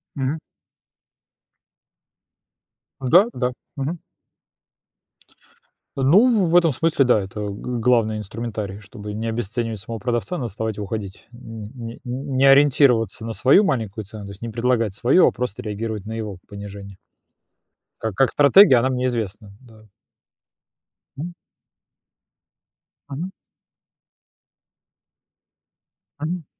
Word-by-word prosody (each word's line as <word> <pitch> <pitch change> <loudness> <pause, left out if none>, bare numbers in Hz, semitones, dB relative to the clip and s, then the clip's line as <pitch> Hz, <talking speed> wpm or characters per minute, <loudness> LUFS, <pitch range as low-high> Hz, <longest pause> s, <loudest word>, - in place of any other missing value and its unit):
Мгм. 135 +3 -1 2.6
Да, 170 +10 +6
да, 125 0 -1 0.3
мгм. 140 +6 -2 2.0
Ну, 195 - +4
в 170 - +1
этом 165 -5 +4
смысле, 160 -2 +2
да, 120 -4 +4
это 95 +2 -7
гл 105 +4 -4
главный 115 -2 +2
инструментарий, 105 -1 -5
чтобы 105 0 -9
не 110 +2 -4
обесценивать 115 -1 -3
самого 115 +2 -6
продавца, 120 - -2
надо 120 -3 -3
вставать 110 +1 -4
и 105 - -4
уходить, 100 -1 -6
н 115 -3 -9
н 115 -2 -8
не 130 +1 -2
ориентироваться 135 -5 +4
на 115 - -4
свою 135 - +5
маленькую 115 - -2
цену, 105 +1 -10
то 100 - -8
есть 100 - -13
не 115 - -4
предлагать 115 -2 0
свою, 130 - +4
а - - +3
просто 125 -5 -4
реагировать 105 -1 -4
на 110 - -7
его 105 -4 -5
понижение. 100 -1 -9 1.0
Ка 110 - -1
как 135 +6 +2
стратегия 145 0 +7
она 130 - +1
мне 125 -1 -1
известна. 105 -3 -4
Да. 110 -4 -18 1.3
Мгм. 170 +4 -6 1.7
Мгм. 160 +7 -4 2.9
Мгм. 165 +1 -4
115 Hz, 115 wpm, -22 LUFS, 105-135 Hz, 2.9 s, стратегия